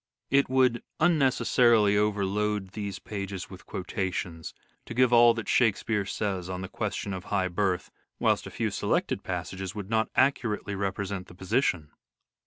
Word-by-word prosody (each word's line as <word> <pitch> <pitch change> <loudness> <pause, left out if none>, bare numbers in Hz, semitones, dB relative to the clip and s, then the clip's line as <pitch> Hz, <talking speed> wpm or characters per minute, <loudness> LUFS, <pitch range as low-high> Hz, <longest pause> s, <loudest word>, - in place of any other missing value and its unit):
It 140 0 +4
would 130 -2 +3 0.2
unnecessarily 125 -9 +4
overload 105 -1 0
these 100 -1 -5
pages 100 0 -6
with 95 -1 -12
quotations 90 -4 -4 0.4
to 120 - -6
give 125 0 +4
all 120 -1 +7
that 115 - -5
Shakespeare 110 -3 +2
says 95 -5 -2
on 90 0 -4
the 95 - -5
question 100 +1 -3
of 95 -1 -6
high 95 -2 0
birth, 90 0 -1 0.3
whilst - - +1
a - - -6
few - - -2
selected - - 0
passages 95 0 -4
would 105 0 -6
not 110 0 +2
accurately 115 -7 +1
represent 100 -1 -3
the 90 - -14
position. 90 - 0
100 Hz, 150 wpm, -28 LUFS, 95-115 Hz, 0.4 s, all